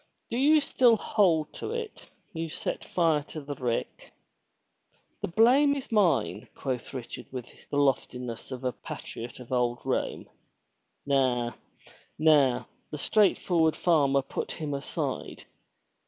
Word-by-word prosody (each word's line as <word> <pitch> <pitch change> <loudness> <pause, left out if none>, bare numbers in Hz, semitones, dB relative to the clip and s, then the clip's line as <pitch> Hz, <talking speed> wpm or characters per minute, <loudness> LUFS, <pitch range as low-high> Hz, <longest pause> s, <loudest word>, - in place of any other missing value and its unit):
Do 235 - -1
you 300 +4 +5
still 245 -4 +4
hold 170 -9 +2
to - - -5
it, 465 -2 -6 0.2
you 165 -1 -3
set - - -4
fire 165 -4 +2
to 155 - -7
the 145 -1 -6
rick?" 125 -4 -3 1.1
*'The - - -1
blame 255 +10 +5
is 275 -4 -6
mine," 205 -6 +2
quoth 130 -3 -4
Richard 130 -4 -7
with 125 -2 -5 0.2
the 145 - -2
loftiness 125 -4 -1
of 130 0 -6
a 125 - +1
patriot 115 0 -8
of 125 0 -11
old 120 -1 +1
Rome. - - -2 0.8
"Na, 130 -4 +2 0.7
na!" 145 -5 +4 0.2
the 150 - -5
straightforward 175 -4 +3
farmer 140 -5 +3
put 135 - -4
him 150 -2 -4
aside. 140 -1 -4
150 Hz, 130 wpm, -28 LUFS, 130-190 Hz, 1.1 s, you